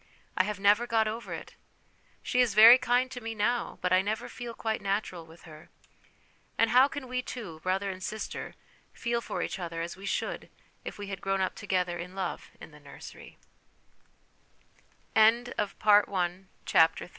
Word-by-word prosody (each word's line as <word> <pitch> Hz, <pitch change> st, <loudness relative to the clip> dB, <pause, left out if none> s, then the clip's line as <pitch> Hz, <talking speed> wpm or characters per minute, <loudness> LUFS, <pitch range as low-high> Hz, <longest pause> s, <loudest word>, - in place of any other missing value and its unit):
I 185 Hz, -, +2 dB
have 210 Hz, -1 st, -4 dB
never 205 Hz, +4 st, +4 dB
got 225 Hz, -2 st, +2 dB
over 225 Hz, +2 st, -5 dB
it; -, -, -7 dB, 0.7 s
she 250 Hz, -, +2 dB
is 235 Hz, -5 st, +1 dB
very 230 Hz, +4 st, +10 dB
kind 250 Hz, +2 st, +1 dB
to 250 Hz, -1 st, -7 dB
me 225 Hz, 0 st, -5 dB
now, 235 Hz, +3 st, -1 dB
but 180 Hz, 0 st, +2 dB
I 185 Hz, -, +5 dB
never 215 Hz, +4 st, -3 dB
feel 240 Hz, -1 st, -8 dB
quite 220 Hz, -1 st, -2 dB
natural 195 Hz, -4 st, -3 dB
with 165 Hz, +1 st, -16 dB
her. 155 Hz, -1 st, -14 dB, 0.9 s
And 230 Hz, -1 st, +3 dB
how 255 Hz, +2 st, +6 dB
can 285 Hz, -3 st, -7 dB
we 250 Hz, 0 st, -2 dB
two, 210 Hz, -11 st, -8 dB
brother 190 Hz, +3 st, -1 dB
and 185 Hz, 0 st, -9 dB
sister, 215 Hz, +3 st, -5 dB, 0.4 s
feel 235 Hz, -1 st, -2 dB
for -, -, -4 dB
each -, -, -4 dB
other 170 Hz, -2 st, -5 dB
as 170 Hz, -, -6 dB
we 195 Hz, +1 st, -9 dB
should -, -, -3 dB, 0.3 s
if -, -, -7 dB
we 205 Hz, -, -6 dB
had 195 Hz, -2 st, -6 dB
grown 195 Hz, 0 st, -1 dB
up 190 Hz, -, 0 dB
together 180 Hz, -4 st, -2 dB
in 180 Hz, +2 st, -8 dB
love 190 Hz, -2 st, -4 dB
in -, -, -11 dB
the -, -, -12 dB
205 Hz, 160 wpm, -29 LUFS, 185-235 Hz, 0.9 s, very